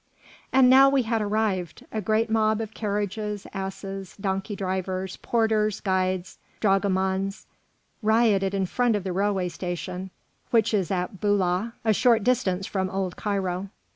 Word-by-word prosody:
And 260 -1 +6
now 265 +2 +8
we 275 -2 +2
had 225 -1 0
arrived. 205 -4 -1
A 215 - -2
great 220 +3 +1
mob 220 -1 +2
of 220 -1 -5
carriages, 210 -1 -3
asses, 195 0 -6
donkey 195 +1 -2
drivers, 190 -1 -3
porters, 220 -3 +1
guides, 185 -1 -1 0.2
dragomans, 195 -1 +1 0.6
rioted 215 -3 +3
in 195 -1 +1
front 240 +4 +1
of 205 - -2
the 190 -2 -3
railway 195 -1 +1
station, 180 +1 -5 0.4
which 225 -1 +3
is 195 -5 +1
at 185 0 -3
Boulah, 205 +1 +1
a 220 - +4
short 230 0 +3
distance 200 -6 +1
from 190 -2 -2
old 190 -1 -2
Cairo. 195 -2 -2
200 Hz, 140 wpm, -25 LUFS, 190-220 Hz, 0.6 s, now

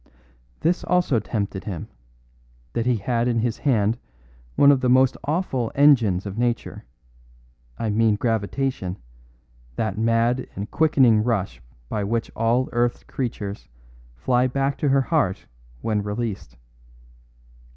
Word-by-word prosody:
"This 175 +2 +1
also 175 -9 +2
tempted 100 -2 -4
him, 90 -7 -5 0.9
that 120 0 -1
he 125 - +3
had 115 +3 -1
in 120 -1 +1
his 115 0 -1
hand 115 -4 +1 0.6
one 140 - +7
of 135 -2 +2
the 125 - +1
most 130 +1 +4
awful 140 -7 -1
engines 120 -10 +4
of 100 +2 -5
nature; 120 - -2 0.9
I 110 - -1
mean 110 0 +3
gravitation, 110 -2 -2 0.8
that 110 - -2
mad 115 +2 +1
and 100 +1 -6
quickening 130 -9 +4
rush 100 - -1 0.3
by 105 - -2
which 115 +3 -2
all 115 +3 +1
earth's 120 0 0
creatures 120 -7 -5 0.5
fly 125 - +1
back 135 +2 -1
to 145 - +1
her 135 0 +4
heart 140 - 0 0.4
when 110 -2 0
released. 105 - -4
115 Hz, 130 wpm, -23 LUFS, 105-130 Hz, 0.9 s, one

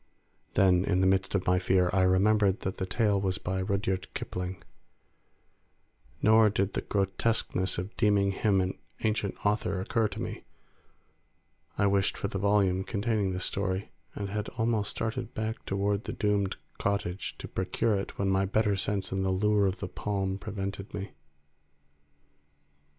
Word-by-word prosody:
Then 90 -2 +5
in 90 -2 +1
the 95 - +3
midst 95 +1 +2
of 95 - 0
my 90 0 +3
fear 90 0 +2
I 95 - +3
remembered 95 +2 +3
that 95 - -3
the 95 - -2
tale 100 0 +2
was 95 -2 0
by 95 +1 -2
Rudyard 95 -1 -1
Kipling; 90 +1 -4 1.6
nor 110 0 +6
did 100 -1 0
the - - -1
grotesqueness 95 -1 0
of 90 +4 -5
deeming 100 -3 +3
him 95 0 +2
an 95 0 -3 0.2
ancient 110 -2 0
author 100 -2 +1
occur 110 +4 +1
to - - -7
me; - - -5 1.3
I 100 - +3
wished 100 -1 +2
for - - -2
the 95 - -3
volume 100 -2 +2
containing 105 -1 0
this 90 0 -1
story, 95 0 -1 0.2
and 100 -1 -4
had 105 +1 -2
almost 110 -3 +1
started 110 -1 -3
back 110 +1 -3
toward 100 +2 0
the - - -4
doomed 100 -2 0 0.2
cottage 100 -2 -2
to - - -7
procure 95 +4 0
it 100 -1 -3
when 100 - 0
my 95 0 +2
better 105 +1 +2
sense 95 0 -1
and 95 0 0
the 95 - +1
lure 100 +1 +3
of 95 0 -3
the 100 - -2
palm 95 0 -2
prevented 100 +1 -5
me. 100 -1 -5
100 Hz, 160 wpm, -29 LUFS, 95-105 Hz, 1.6 s, nor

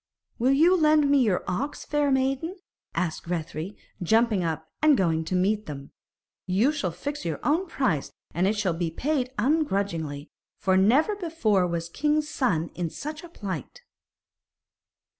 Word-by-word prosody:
'Will 255 +3 +4
you 330 +6 +5
lend 305 -3 +4
me 285 -2 +5
your 210 -7 +2
ox, 225 +11 -3
fair 295 -1 +1
maiden?' 270 +6 0 0.4
asked 170 -4 -2
Grethari, 170 +2 -4 0.2
jumping 220 +1 +3
up 160 -1 -3
and 305 -3 +5
going 165 -3 +1
to 185 - -2
meet 205 +4 +1
them. 140 -2 -7 0.6
'You 205 +10 +3
shall 250 -12 -2
fix 285 - -5
your 165 -4 -3
own 335 +6 +1
price, 215 - -1 0.2
and 175 +4 +2
it 210 +2 +1
shall 195 -4 +1
be 165 0 -1
paid 255 - -1
ungrudgingly, 195 - 0 0.3
for 190 -1 +2
never 255 - +4
before 310 - +1
was 170 -1 -2
king's 300 - 0
son 180 - 0
in 175 -2 -3
such 305 - -6
a 345 - -10
plight.' 190 - -6
210 Hz, 155 wpm, -26 LUFS, -, 0.6 s, you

